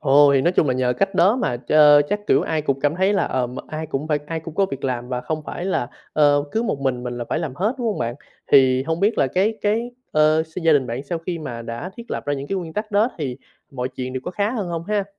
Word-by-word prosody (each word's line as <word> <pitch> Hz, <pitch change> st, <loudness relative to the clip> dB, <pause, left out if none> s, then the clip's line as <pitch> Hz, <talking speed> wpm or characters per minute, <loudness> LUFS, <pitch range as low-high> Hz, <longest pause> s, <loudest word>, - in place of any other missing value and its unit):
Ồ, 145 Hz, 0 st, +6 dB
thì 135 Hz, -, +4 dB
nói 175 Hz, +6 st, +2 dB
chung 160 Hz, -, +3 dB
là 130 Hz, -, +2 dB
nhờ 125 Hz, -1 st, +1 dB
cách 195 Hz, +9 st, -1 dB
đó 200 Hz, +8 st, +4 dB
mà 125 Hz, -, -1 dB
ch 125 Hz, -, -7 dB, 0.4 s
chắc, 205 Hz, 0 st, -2 dB
kiểu, -, -, +4 dB
ai 160 Hz, -2 st, -1 dB
cũng 135 Hz, -2 st, -1 dB
cảm 145 Hz, +2 st, +1 dB
thấy 190 Hz, +3 st, +2 dB
là, 200 Hz, -, +2 dB
ờm, 125 Hz, 0 st, -2 dB
ai 155 Hz, 0 st, -5 dB
cũng 150 Hz, +1 st, -4 dB
phải 150 Hz, -1 st, +2 dB
ai 165 Hz, 0 st, -3 dB
cũng 160 Hz, 0 st, -9 dB
có 195 Hz, +1 st, +2 dB
việc 135 Hz, -4 st, -6 dB
làm 125 Hz, -1 st, -2 dB
và 125 Hz, -1 st, -2 dB
không 155 Hz, +2 st, -4 dB
phải 175 Hz, -, -5 dB
là, 180 Hz, -10 st, -1 dB, 0.2 s
ờ, 145 Hz, -1 st, +4 dB
cứ 225 Hz, -, +1 dB
một 150 Hz, -11 st, -2 dB
mình 130 Hz, -2 st, -1 dB
mình 120 Hz, -1 st, -4 dB
là 120 Hz, -, -3 dB
phải -, -, 0 dB
làm 155 Hz, -6 st, -4 dB
hết, 210 Hz, -, 0 dB
đúng 240 Hz, -, -2 dB
hông 215 Hz, -, -1 dB
bạn? 120 Hz, 0 st, -2 dB, 0.4 s
Thì 130 Hz, -2 st, +6 dB
hông 160 Hz, +3 st, -2 dB
biết 205 Hz, +3 st, +2 dB
là 135 Hz, -, +4 dB
cái 195 Hz, -, +1 dB
cái, 225 Hz, +4 st, 0 dB, 0.2 s
ờ, 155 Hz, +1 st, +4 dB
s 160 Hz, +3 st, -8 dB
gia 165 Hz, -1 st, +5 dB
đình 135 Hz, -4 st, +3 dB
bạn 120 Hz, +4 st, -4 dB
sau 165 Hz, +3 st, -3 dB
khi 170 Hz, +1 st, -4 dB
mà 120 Hz, -6 st, -6 dB
đã 115 Hz, +11 st, -6 dB
thiết 235 Hz, 0 st, -10 dB
lập -, -, -3 dB
ra 145 Hz, -, +1 dB
những 140 Hz, +1 st, -5 dB
cái 195 Hz, -, -2 dB
nguyên 165 Hz, -3 st, -6 dB
tắc 210 Hz, +3 st, -4 dB
đó 210 Hz, +5 st, +3 dB
thì 130 Hz, -5 st, -3 dB, 0.3 s
mọi 125 Hz, -1 st, -3 dB
chuyện 130 Hz, 0 st, -6 dB
đều 130 Hz, -, -3 dB
có -, -, -3 dB
khá 200 Hz, +3 st, -1 dB
hơn 210 Hz, -7 st, -3 dB
hông 165 Hz, -1 st, -4 dB
ha? 210 Hz, -1 st, 0 dB
155 Hz, 290 wpm, -22 LUFS, 130-190 Hz, 0.4 s, Ồ